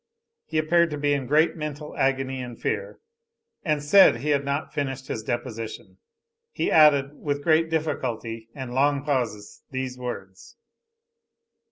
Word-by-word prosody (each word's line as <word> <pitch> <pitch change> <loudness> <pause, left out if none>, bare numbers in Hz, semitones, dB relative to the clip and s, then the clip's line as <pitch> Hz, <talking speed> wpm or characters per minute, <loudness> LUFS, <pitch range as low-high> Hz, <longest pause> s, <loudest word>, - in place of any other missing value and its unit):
He 160 - -3
appeared 170 +2 +3
to 150 - -4
be 145 0 +1
in 135 -3 -2
great 155 +4 +3
mental 150 -1 -6
agony 135 -1 0
and 120 -2 -8
fear; - - -3 0.7
and 150 -4 0
said 175 0 +7
he 150 - -2
had 140 -1 +2
not 140 +2 -3
finished 135 -2 -3
his 110 - -3
deposition. 115 -4 -5 0.5
He - - -1
added, 145 -3 +5
with 145 -1 -3
great 160 0 +3
difficulty 120 -8 -3
and 130 -3 -6
long 140 +1 +2
pauses 120 -8 -2
these 130 -1 -4
words. 95 -7 -7
140 Hz, 145 wpm, -25 LUFS, 125-150 Hz, 0.7 s, said